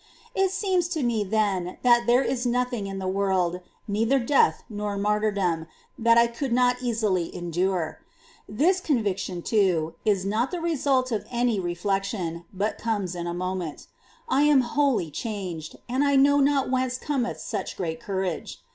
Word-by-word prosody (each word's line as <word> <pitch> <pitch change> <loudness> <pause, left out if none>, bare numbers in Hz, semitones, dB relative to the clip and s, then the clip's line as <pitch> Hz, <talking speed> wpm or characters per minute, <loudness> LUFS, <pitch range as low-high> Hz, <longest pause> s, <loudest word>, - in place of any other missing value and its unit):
It 385 -4 +2
seems 380 -3 0
to 295 - -1
me 230 -3 +1
then 195 -3 0
that 240 -1 +4
there 245 +3 +5
is 250 -2 -1
nothing 245 -3 -1
in 195 0 -5
the 190 -1 -3
world, 185 -2 +1 0.3
neither 225 +6 +2
death 265 +2 +3
nor 205 -2 -4
martyr 210 +1 +1
dom, 175 -5 -1 0.3
that 230 -1 +4
I 235 - +7
could 235 +3 -4
not 250 +1 +3
easily 215 -8 0
endure. 175 -1 -1 0.5
This 330 - +2
conviction, 195 - -1
too, 180 -7 +1
is 200 -4 +1
not 220 +6 0
the 360 - -4
result 275 -6 +1
of 215 -3 -2
any 240 -3 +1
reflection, 180 -1 -2
but 205 +3 -2
comes 205 -6 -1
in 175 -1 -4
a 170 - -2
moment. 180 -3 -4 0.4
I 270 - +2
am 295 -2 +5
wholly 250 - +1
changed, 180 - -5
and 255 +3 +1
I 280 -1 +3
know 285 +1 +5
not 275 -2 +2
whence 255 -1 0
cometh 260 -4 -2
such - - -4
great 160 -3 -3
courage. 190 -2 -3
215 Hz, 165 wpm, -25 LUFS, 185-255 Hz, 0.5 s, I